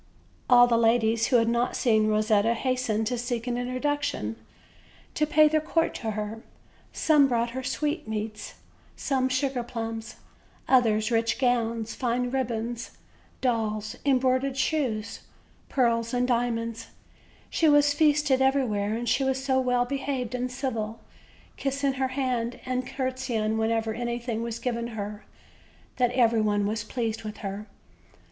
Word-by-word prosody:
All 245 -1 +8
the 235 -1 +2
ladies 225 -1 +3
who 260 - +2
had 230 -1 +4
not 235 +1 +1
seen 220 -3 +3
Eosetta 215 +1 +2
hastened 250 -3 -1
to 245 +2 -1
seek 240 -1 -3
an 245 -1 -1
introduction, 255 - -2 0.8
to 300 - +1
pay 305 0 +6
their 310 0 +2
court 325 +1 0
to 225 - -4
her; 215 +1 -4 0.5
some 300 -3 +4
brought 235 -2 0
her 260 +2 -4
sweetmeats, 220 -8 -3 0.4
some 260 -2 0
sugar 260 0 0
plums, 225 -1 -5 0.5
others 225 -3 +3
rich 230 0 +1
gowns, 230 -3 0
fine 245 0 -1
ribbons, 235 -2 -3 0.4
dolls, 220 -2 -1
embroidered 260 0 +2
shoes, 260 -6 -1 0.5
pearls 235 -2 +1
and 250 0 +1
diamonds; 230 -2 -1 0.6
she 320 - +3
was 290 0 +5
feasted 295 -3 +3
everywhere, 230 -6 +1
and 240 +1 -4
she 270 - +2
was 265 0 0
so 265 -1 +2
well 250 -1 +1
behaved 270 -2 -3
and 250 0 -2
civil, 230 -4 -3 0.6
kissing 275 0 0
her 265 0 0
hand 255 -3 -2
and 255 0 -2
conrtesying 255 -5 -2
whenever 225 0 0
anything 240 0 -3
was 230 -1 -3
given 235 -2 -2
her, 205 0 -5 0.7
that 245 -1 +3
every 230 -3 +3
one 205 -1 +1
was 215 +1 -2
pleased 225 -2 -3
with 215 -1 -6
her. 200 +2 -5
240 Hz, 140 wpm, -27 LUFS, 225-260 Hz, 0.8 s, All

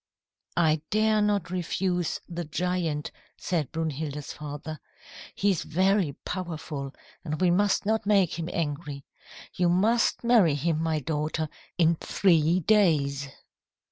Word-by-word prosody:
"'I 160 -3 +3
dare 215 0 +3
not 205 -4 0
refuse 180 -1 -1
the 175 -1 -4
giant,' 165 -1 -2 0.3
said 160 -7 -2
Brunhilda's 155 -2 -4
father. 150 +1 -7 0.6
'He 200 0 +2
is 180 - -1
very 185 -2 +1
powerful, 160 -6 -5 0.3
and 155 -3 -3
we 180 -1 +3
must 200 +3 +2
not 220 0 0
make 195 -5 +3
him 165 +1 -3
angry. 145 -3 -3 0.5
You 180 -1 +2
must 215 +9 +2
marry 220 -11 +5
him, 155 +2 0
my 160 -2 0
daughter, 155 +2 -2 0.3
in 165 -1 +3
three 170 -1 +2
days.' 150 -8 +2
170 Hz, 125 wpm, -27 LUFS, 150-185 Hz, 0.6 s, marry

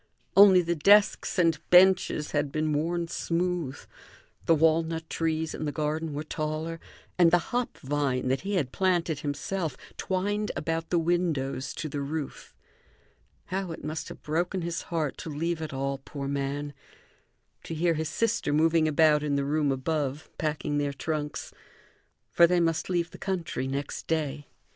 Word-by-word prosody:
Only 195 -2 +8
the 170 +1 0
desks 200 +8 +4
and 165 -4 +3
benches 180 -4 +5
had 145 -2 0
been 155 0 0
worn 170 +3 -1
smooth; 170 -4 -2 0.7
the 165 - +6
walnut 160 +1 +2
trees 160 -1 -1
in 155 - -4
the 145 - -1
garden 155 +2 -2
were 150 - -3
taller, 155 +2 -3 0.4
and 170 -2 +7
the 175 +1 +1
hop 245 0 -1
vine, 135 -2 -1
that 130 - +1
he 200 +2 -2
had 140 -9 0
planted 175 -5 +1
himself 150 +1 -3 0.2
twined 205 +3 -1
about 165 0 -2
the 175 - +2
windows 165 -6 0
to 160 - -4
the 145 -1 -4
roof. 145 0 -5 1.0
How 190 -2 -2
it - - -10
must 155 +1 -4
have - - -11
broken 175 +4 -1
his 170 0 -2
heart 160 -5 -1
to - - -6
leave 160 +2 -2
it 155 - -4
all, 135 0 -2
poor 140 0 -6
man; 140 +1 -3 0.9
to 165 - -5
hear 170 +2 +2
his 160 0 -2
sister 230 -9 0
moving 160 +1 +3
about 155 0 +4
in 145 -1 0
the 140 0 0
room 145 0 +1
above, 140 +1 -2
packing 150 -1 -1
their 145 -1 -1
trunks! 150 +1 -4 0.8
For 170 - +6
they 180 +1 +2
must 165 0 0
leave 175 -2 0
the - - -12
country 175 -9 -2
next 140 +1 -4
day. 150 -3 -2
160 Hz, 160 wpm, -28 LUFS, 145-170 Hz, 1.0 s, Only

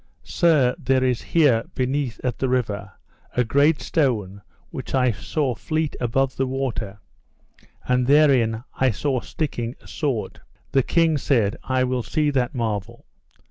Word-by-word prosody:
Sir, 150 -8 +3
there 130 -3 +1
is 125 -2 +1
here 140 -9 +3
beneath 130 -1 -1
at 125 -3 -2
the 130 - 0
river 105 -6 -2 0.4
a 125 - +4
great 145 +6 +3
stone 105 - -1 0.3
which - - -5
I 125 -2 +3
saw 130 +6 -2
fleet 155 +5 -2
above 130 +2 0
the 135 - 0
water, 120 -6 -3 0.9
and 125 0 +2
therein 130 -6 +4
I 130 - +2
saw 130 +4 -1
sticking 120 -4 -4
a - - -18
sword. 135 -8 -3 0.3
The 135 - +4
king 165 +2 +2
said: 115 -6 +1
I 130 -1 0
will 125 0 0
see 150 +6 0
that 130 -1 -1
marvel. 115 -1 -3
130 Hz, 145 wpm, -23 LUFS, 115-140 Hz, 0.9 s, a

